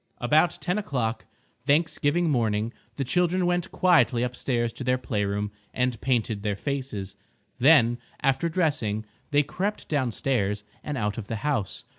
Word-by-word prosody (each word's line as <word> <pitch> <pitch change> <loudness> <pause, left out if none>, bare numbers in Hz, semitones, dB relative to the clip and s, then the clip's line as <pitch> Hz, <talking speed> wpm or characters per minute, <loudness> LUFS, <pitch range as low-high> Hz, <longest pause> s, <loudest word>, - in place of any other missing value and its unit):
About 155 +7 +3
10 180 +4 0
o'clock 120 - -2 0.4
Thanksgiving 160 +2 +2
morning 115 -5 +1 0.2
the 140 - -1
children 180 +6 +2
went 175 0 0
quietly 165 -9 +4
upstairs 120 -1 -1
to - - -7
their 125 0 +2
playroom 105 -4 -2 0.2
and 125 -2 0
painted 115 -5 0
their 105 -1 -1
faces. 130 -6 -4 0.4
Then, 120 -4 +5 0.2
after 135 +5 +1
dressing, 145 - 0 0.2
they 145 -1 +4
crept 195 +8 -3
downstairs 120 -7 0 0.2
and 150 -2 -3
out 105 -1 -1
of 105 - -7
the 115 - -3
house. 130 -11 -1
130 Hz, 140 wpm, -26 LUFS, 110-150 Hz, 0.4 s, Then